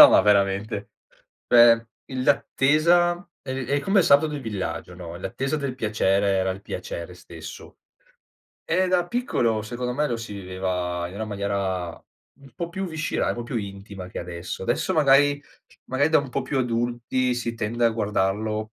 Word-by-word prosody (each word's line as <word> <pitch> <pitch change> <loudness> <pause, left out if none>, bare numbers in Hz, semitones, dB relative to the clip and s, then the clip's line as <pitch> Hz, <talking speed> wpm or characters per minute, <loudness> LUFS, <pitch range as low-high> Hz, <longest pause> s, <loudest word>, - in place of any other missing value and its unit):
No, - - +13
ma - - +7
veramente. 100 +1 +1 0.6
Cioè 115 -1 +7 0.2
il 130 -1 -4
l'attesa 170 +6 +3
è 130 -1 -4
è 140 +3 +1
come 195 +6 +2
il - - +2
sabato 140 +3 +6
del 150 -1 -4
villaggio, 95 -7 -4
no, 85 -1 -8
l'attesa 135 - -2
del 140 -3 -3
piacere, 100 -4 +1
era 95 -1 +1
il 95 +2 -6
piacere 85 -2 -6
stesso. 85 -2 -11 0.9
E 185 +3 +1
da 180 -1 +2
piccolo 120 - 0
secondo 125 +3 -3
me 150 +3 0
lo 120 - -1
si 115 -2 -7
viveva 90 -2 -3
in 90 - -11
una 110 +2 -3
maniera 100 -3 -2 0.5
un 140 -1 -17
po' 170 - -4
più 190 +3 -4
viscerale, 160 -2 -1
proprio 120 +1 -4
intima 100 -2 -6
che - - -7
adesso. 85 +1 -6
Adesso 120 - 0
magari 145 -2 +4 0.5
magari 135 +3 +2
da 160 - +6
un 140 -1 -3
po' 135 - -1
più 130 +1 -2
adulti 120 +1 0
si 120 -1 -3
tende 115 +2 -1
a 115 - +5
guardarlo 105 0 0
115 Hz, 165 wpm, -24 LUFS, 100-140 Hz, 0.9 s, No